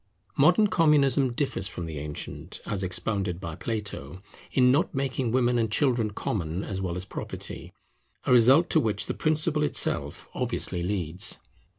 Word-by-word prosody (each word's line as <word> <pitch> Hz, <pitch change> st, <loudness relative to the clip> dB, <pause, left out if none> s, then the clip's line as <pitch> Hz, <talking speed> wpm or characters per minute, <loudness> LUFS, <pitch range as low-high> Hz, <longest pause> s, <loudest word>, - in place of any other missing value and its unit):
Modern 175 Hz, +9 st, +5 dB
Communism 145 Hz, -, +3 dB
differs -, -, -1 dB
from 85 Hz, -, -6 dB
the 80 Hz, -3 st, -5 dB
ancient, 75 Hz, 0 st, -6 dB
as 100 Hz, -2 st, -2 dB
expounded 95 Hz, 0 st, -2 dB
by 85 Hz, -4 st, -6 dB
Plato, 95 Hz, -5 st, -5 dB, 0.3 s
in 125 Hz, -1 st, +4 dB
not 145 Hz, +2 st, +1 dB
making 135 Hz, -2 st, -1 dB
women 120 Hz, -1 st, +2 dB
and 110 Hz, -2 st, 0 dB
children 120 Hz, -5 st, +2 dB
common 95 Hz, -4 st, -3 dB
as 95 Hz, -1 st, -4 dB
well 90 Hz, -2 st, -2 dB
as 90 Hz, -, -3 dB
property; -, -, -7 dB, 0.5 s
a -, -, +1 dB
result 130 Hz, +7 st, +6 dB
to 160 Hz, -, +5 dB
which 105 Hz, -7 st, -1 dB
the -, -, -3 dB
principle 155 Hz, 0 st, +1 dB
itself 150 Hz, -, 0 dB
obviously 90 Hz, -1 st, -1 dB
leads. 90 Hz, -2 st, 0 dB
110 Hz, 155 wpm, -27 LUFS, 90-135 Hz, 0.5 s, result